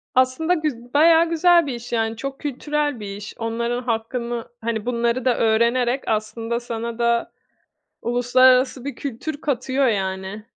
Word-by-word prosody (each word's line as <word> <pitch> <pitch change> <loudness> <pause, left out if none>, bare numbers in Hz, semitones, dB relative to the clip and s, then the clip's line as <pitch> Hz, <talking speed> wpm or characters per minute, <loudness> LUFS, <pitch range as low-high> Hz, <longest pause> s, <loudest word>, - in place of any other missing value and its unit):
Aslında 260 +7 +2
güz 265 -8 -3
bayağı 325 +3 +5
güzel 340 0 +4
bir 270 - -2
iş, 240 0 -9
yani. 225 -1 0
Çok 275 +3 -5
kültürel 295 -1 -2
bir 200 -1 -6
iş. 205 0 -8
Onların 235 +2 -2
hakkını 235 0 -3
hani, 225 -1 -2
bunları 235 +1 0
da 250 -2 +2
öğrenerek 235 +3 +2
aslında 225 +2 -2
sana 235 -1 -5
da 235 0 +1 0.7
uluslararası 255 +2 +3
bir 280 -3 -5
kültür 285 +3 -5
katıyor, 265 -1 0
yani. 190 0 -2
240 Hz, 140 wpm, -22 LUFS, 230-270 Hz, 0.7 s, bayağı